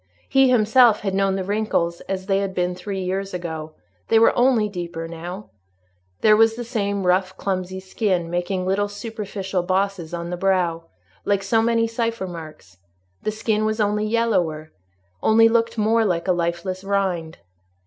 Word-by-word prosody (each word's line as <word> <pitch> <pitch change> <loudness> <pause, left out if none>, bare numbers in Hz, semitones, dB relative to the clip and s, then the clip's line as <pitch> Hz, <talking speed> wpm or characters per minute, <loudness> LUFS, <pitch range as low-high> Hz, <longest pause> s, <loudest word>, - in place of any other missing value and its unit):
He 270 -1 +4
himself 235 -1 +5
had 195 -2 -2
known 195 0 +1
the 190 - -2
wrinkles 190 -4 -1
as 190 -1 -3
they 195 -1 +1
had 195 -1 -3
been 180 0 0
three 190 +1 -5
years 190 +1 -3
ago; 160 -3 -5 0.3
they 225 - +4
were 225 - +5
only 245 -4 +3
deeper 170 -4 -5
now: 175 +5 -8 0.7
there 215 -1 +6
was 225 +1 +4
the 240 - -5
same 200 -5 -2
rough, 185 +1 +1
clumsy 185 -1 -3
skin, 190 -2 -1
making 175 +2 -2
little 195 +2 +1
superficial 205 -3 -4
bosses 185 -2 -1
on 170 0 -5
the 180 - -3
brow, 175 -3 0 0.4
like 200 -1 +1
so 225 +3 +2
many 230 0 +2
cipher 230 -2 -2
marks; 155 - -10 0.4
the 215 - -1
skin 215 0 -1
was 215 +1 -1
only 210 0 +1
yellower, 185 -9 0 0.5
only 225 +1 +5
looked 230 0 +1
more 220 +1 +3
like 175 -4 -1
a - - +4
lifeless 175 +2 -2
rind. 190 -5 -1
195 Hz, 165 wpm, -22 LUFS, 180-215 Hz, 0.7 s, there